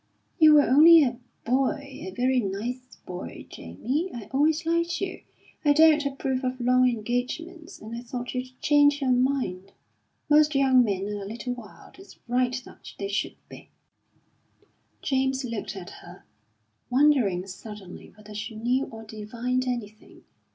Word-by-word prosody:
"You 310 -1 +8
were 295 - +7
only 315 +4 +8
a 245 -2 -2 0.3
boy 270 +1 -1
a - - -4
very 250 +6 +1
nice 240 +5 -4
boy, 180 0 -8
Jamie. 255 - -3
I 235 -7 -7
always 310 +4 +2
liked 335 +1 0
you. 370 -2 -4 0.4
I 290 -2 +5
don't 310 0 +5
approve 270 -1 -3
of 255 0 -2
long 250 +1 +4
engagements, 255 - -4
and 220 +2 -8
I 235 - -6
thought 245 0 -6
you'd 255 0 -6
change 290 -1 +4
your 265 -3 +1
mind. 245 -8 0 0.5
Most 300 0 +4
young 265 -2 +5
men 195 -4 -1
are 205 -1 -4
a 195 - -6
little 240 +4 -4
wild; 235 - -13
it's 385 - -15
right 250 +1 0
that - - -13
they 200 -1 -4
should 200 - -2
be." - - -13 1.3
James 265 -1 0
looked 230 -3 -5
at 185 -1 -8
her, - - -13 0.7
wondering 250 -9 +3
suddenly 195 -1 -10
whether 210 0 -13
she 215 +2 -6
knew 245 +5 0
or 225 -1 -10
divined 235 +4 -3
anything. 220 -4 -6
250 Hz, 150 wpm, -26 LUFS, 220-280 Hz, 1.3 s, You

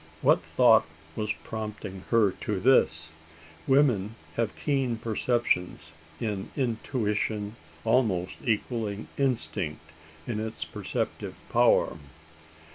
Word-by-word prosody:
What - - +5
thought - - +5 0.3
was 105 -1 -1
prompting 105 -3 -6
her 110 -4 +4
to 100 +1 -3
this? 85 -10 +3 0.6
Women 120 -7 +3 0.2
have 115 -2 -1
keen 135 -5 0
perceptions 110 -7 0 0.3
in 105 -4 -3
intuition 110 -4 -1 0.3
almost 110 -7 +1
equalling 110 -3 -1
instinct 85 - -1 0.3
in 115 -3 -2
its 110 -7 -4
perceptive 80 - -4 0.2
power. 80 - +4
110 Hz, 95 wpm, -28 LUFS, 95-120 Hz, 0.6 s, What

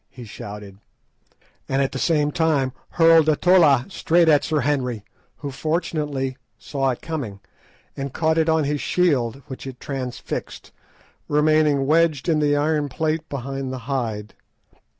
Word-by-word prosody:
he 125 - -11
shouted, 105 -2 -9 0.9
and 135 - +1
at 135 -1 +1
the 135 - -4
same 150 -2 +2
time 145 -5 +1 0.2
hurled 165 -2 +5
a 155 - +4
tolla 155 -8 +4
straight 170 -3 +2
at 150 -3 +5
Sir 155 -2 0
Henry, 125 -6 -1 0.3
who 145 -1 -6
fortunately 150 -3 -2 0.2
saw 135 -2 -2
it 125 - -4
coming, 135 -12 -5 0.6
and 135 0 -4
caught 160 +3 +1
it 160 0 +2
on 160 -1 +3
his 145 0 -1
shield, 135 -8 +1
which 130 0 -8
it 130 -2 -8
transfixed, 130 -3 -6 0.6
remaining 150 -2 +3
wedged 155 -1 +2
in 160 -3 +2
the 145 -1 +2
iron 150 0 0
plate 160 +3 -2
behind 135 0 -4
the 130 - -4
hide. 115 -6 -3
145 Hz, 150 wpm, -22 LUFS, 130-155 Hz, 0.9 s, hurled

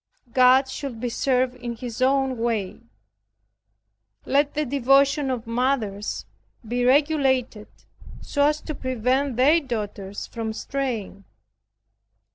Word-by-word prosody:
God 255 +1 +5
should 265 -3 -6
be 245 +1 -2
served 255 +1 +1
in 240 -1 -5
His 240 +1 -7
own 265 -1 +2
way. 225 -4 -2 1.4
Let 285 +1 +1
the 300 0 0
devotion 275 +2 +3
of 250 -2 -3
mothers 230 -4 -1 0.4
be 245 +2 -1
regulated 265 -5 +2 0.5
so 285 0 +1
as 300 0 0
to 310 - -5
prevent 260 +1 -1
their 290 +6 +5
daughters 205 -7 -5
from 225 -2 -5
straying. 225 -7 -4
255 Hz, 110 wpm, -24 LUFS, 230-275 Hz, 1.4 s, God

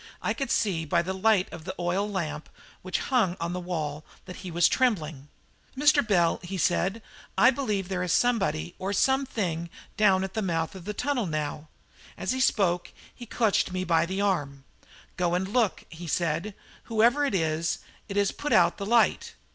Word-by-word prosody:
I - - -1
could 275 - -4
see 190 -7 +1
by 165 +2 +1
the 190 +2 -3
light 190 0 +3
of 170 -2 -8
the - - -6
oil 180 +4 0
lamp 155 -6 -4 0.3
which 185 0 -2 0.2
hung 190 -8 +2
on 170 +1 -2
the 180 - -3
wall 155 -4 -4 0.2
that 185 - -9
he 185 - -7
was 170 0 +4
trembling. 160 - 0 0.5
"Mr. 295 +1 +5
Bell," 175 -6 +2
he 190 +1 -5
said, 190 +5 0 0.3
"I 250 - +7
believe 215 -8 -2
there 185 -1 -2
is 180 -2 -1
somebody 195 - +1
or 190 +2 -2
something 205 -10 0 0.3
down 195 -3 +4
at 190 0 -5
the 220 - -1
mouth 165 -4 -1
of 185 -3 -10
the 210 0 -4
tunnel 250 -5 -1
now." 155 -1 -4 0.5
As - - -2
he 260 - -1
spoke 190 -9 +1 0.2
he 240 - -11
clutched 220 -4 +1
me 185 0 -2
by 170 -2 +2
the 190 +2 -2
arm. 145 -9 -1 0.5
"Go 175 -1 +1
and 185 +1 -1
look," 225 -1 0
he 170 +1 -9
said; 170 +5 -1 0.3
"whoever 235 +5 +3
it 275 -8 0
is, 165 -1 0 0.3
it 200 - -5
has 200 -1 +2
put 295 - -5
out 175 -1 +4
the 200 - -4
light." 235 +1 +2
185 Hz, 185 wpm, -27 LUFS, 170-215 Hz, 0.5 s, I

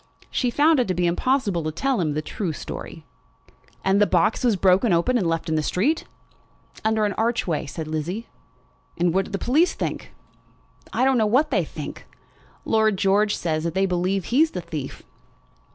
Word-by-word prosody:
She 250 - 0
found 295 +4 +3
it 245 - +1
to 185 - -1
be 175 0 +1
impossible 200 +1 +1
to 155 0 -3
tell 265 - 0
him 155 -3 0
the 155 - -2
true 175 0 -3
story. - - -8 0.8
"And 195 +2 +3
the 205 - +5
box 180 +7 +2
was 235 -4 +3
broken 190 +4 +3
open, 170 +9 +2
and 200 -8 +1
left 165 0 -1
in 160 - -1
the 155 - +1
street?" 245 - 0 0.8
"Under 220 0 +2
an 205 - -1
archway," 225 -10 0
said 155 +3 -6
Lizzie. 165 +8 -4 0.7
"And 175 -1 +1
what 190 +1 +1
do - - -11
the 195 - -1
police 300 - +2
think?" - - -4 0.8
"I 255 - +1
don't 265 -2 +3
know 215 - +3
what 280 +8 +2
they 195 -8 +2
think. 155 -1 -8 0.6
Lord 220 -2 +2
George 205 +2 +2
says 155 -2 -2
that 170 0 -3
they 190 +1 +3
believe 185 +1 -1
he 255 +5 +2
is 320 - +4
the 180 - -5
thief." 155 -5 -7
195 Hz, 190 wpm, -23 LUFS, 170-235 Hz, 0.8 s, the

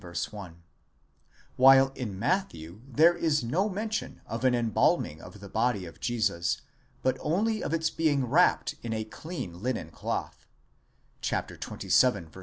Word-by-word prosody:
1); 85 -1 -6 0.9
while 135 +1 +7
in 120 -7 -6
Matthew 100 - -2
there 160 +7 +5
is 155 -4 +1
no 180 - 0
men 210 +3 -4
tion 215 - -4
of 115 +2 -5
an 130 -1 +4
embalming 110 -9 +1
of 95 +3 -12
the 100 - -10
body 110 -2 0
of 85 - -12
Jesus, 110 -8 0 0.4
but 130 0 +1
only 215 +7 0
of - - -3
its 160 -1 0
being 145 -5 +1
wrapped 155 +9 +3
in 115 -1 -4
a 110 0 -2
clean 110 - -7
linen 110 -9 -3
cloth - - -5 0.7
(xxvii. 85 - 0
125 Hz, 140 wpm, -28 LUFS, 100-160 Hz, 0.9 s, while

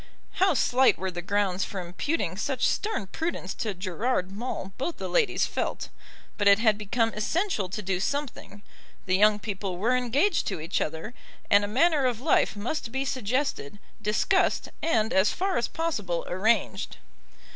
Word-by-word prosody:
How 380 -4 +5
slight 255 +2 +4
were 190 0 -3
the 175 0 -5
grounds 195 0 0
for 195 - -5
imputing 180 - -2
such 260 +5 -1
stern 420 - -1
prudence 265 - -4
to 210 -4 -3
Gerard 185 +2 -1
Maule 200 -2 -5
both 330 +6 -2
the - - -4
ladies 480 -3 +2
felt; - - -3 0.5
but 205 - +3
it 200 0 +8
had 220 -1 +3
become 225 +2 0
essential 215 - -1
to 210 +3 -5
do 190 -1 -1
something; 255 -3 -4 0.4
the 185 - +2
young 210 +2 +5
people 195 -3 -4
were 230 +7 +2
engaged 270 - +1
to 190 -5 -2
each 165 +4 -2
other, 160 +9 -4 0.4
and 200 0 +6
a - - -1
manner 275 +5 +3
of 240 -3 -1
life 290 -3 +2
must 230 +4 -3
be 265 +2 -1
suggested, 255 - -2 0.2
discussed, 220 - +1
and 225 -7 +1
as 190 +2 +4
far 380 +1 -1
as 240 - +1
possible 210 - -2
arranged. 210 +4 0
215 Hz, 165 wpm, -27 LUFS, 195-270 Hz, 0.5 s, it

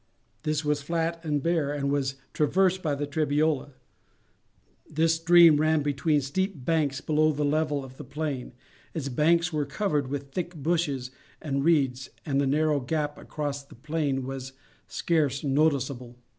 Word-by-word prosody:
This 155 +1 -1
was 150 -1 +1
flat 165 +2 -2
and 150 -3 -1
bare, 165 -4 +1
and 140 -1 -1
was 135 -1 0 0.2
traversed 185 +5 +2
by 150 -4 0
the 145 +1 -2
Trebiola. 145 -1 0 1.2
This 160 +2 +2
stream 165 -1 +6
ran 155 0 +2
between 145 +1 +1
steep 155 +1 -2
banks 145 -4 +1
below 155 0 +2
the 150 0 -1
level 150 -1 0
of 130 0 -13
the - - -8
plain; 145 -4 -4 0.4
its 145 -4 -3
banks 165 +6 +2
were 150 -1 +1
covered 145 0 -1
with 140 0 -5
thick 175 +2 -4
bushes 145 -5 -1 0.3
and 140 -3 -2
reeds, 135 -5 +2 0.2
and 140 -3 +1
the 140 - +1
narrow 150 +1 +2
gap 145 +3 -2
across 145 -2 -4
the 140 - -16
plain 140 0 -2
was 135 0 -6 0.3
scarce 145 - 0
noticeable. 135 -4 0
150 Hz, 155 wpm, -27 LUFS, 140-160 Hz, 1.2 s, stream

